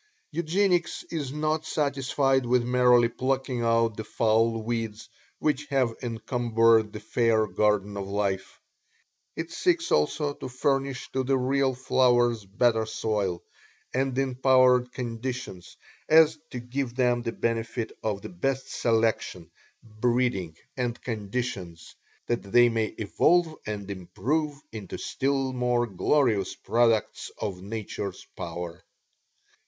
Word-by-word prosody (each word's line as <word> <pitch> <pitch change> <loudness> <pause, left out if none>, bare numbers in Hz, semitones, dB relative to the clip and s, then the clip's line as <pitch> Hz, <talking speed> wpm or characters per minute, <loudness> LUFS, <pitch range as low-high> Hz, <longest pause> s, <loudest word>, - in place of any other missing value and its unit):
Eugenics 175 +2 +1
is 145 -6 -3
not 155 +1 -1
satisfied 140 -3 +1
with 125 0 +3
merely 125 -1 +4
plucking 130 +1 -2
out 115 -1 +2
the 110 - -4
foul 115 +1 +1
weeds 115 -1 -3 0.3
which 150 -1 -1
have 130 -5 +1
encumbered 115 -2 +2
the 105 - -7
fair 110 0 +2
garden 105 -1 +1
of 100 -1 -4
life 100 -1 -2 0.8
it 165 0 -5
seeks 340 -2 +1
also 150 -1 +1
to 130 - -7
furnish 135 +1 -1
to 130 - 0
the 135 +1 +2
real 130 +1 +1
flowers 120 -3 +2
better 110 +3 +2
soil, 105 -5 -2 0.5
and 130 0 0
improved 130 -1 +3
conditions, 120 -6 -6 0.3
and 160 0 +6
to 125 - -5
give 125 0 -4
them 125 -2 +2
the 115 -1 -3
benefit 115 0 -2
of 105 -2 -2
the - - -6
best 135 -7 -2
selection, 110 -7 0 0.3
breeding 110 -6 -1 0.2
and 120 -2 -2
conditions, 100 -7 -4 0.3
that 120 - -1
they 120 +5 +4
may 115 -1 +1
evolve 160 - +2
and 100 -2 -4
improve 120 - -2
into 105 -5 -7
still 135 -1 -1
more 125 -1 +1
glorious 105 0 +1
products 115 -2 +1
of 95 -3 -4
nature's 105 0 -5
power. 85 0 -6
120 Hz, 120 wpm, -27 LUFS, 110-135 Hz, 0.8 s, and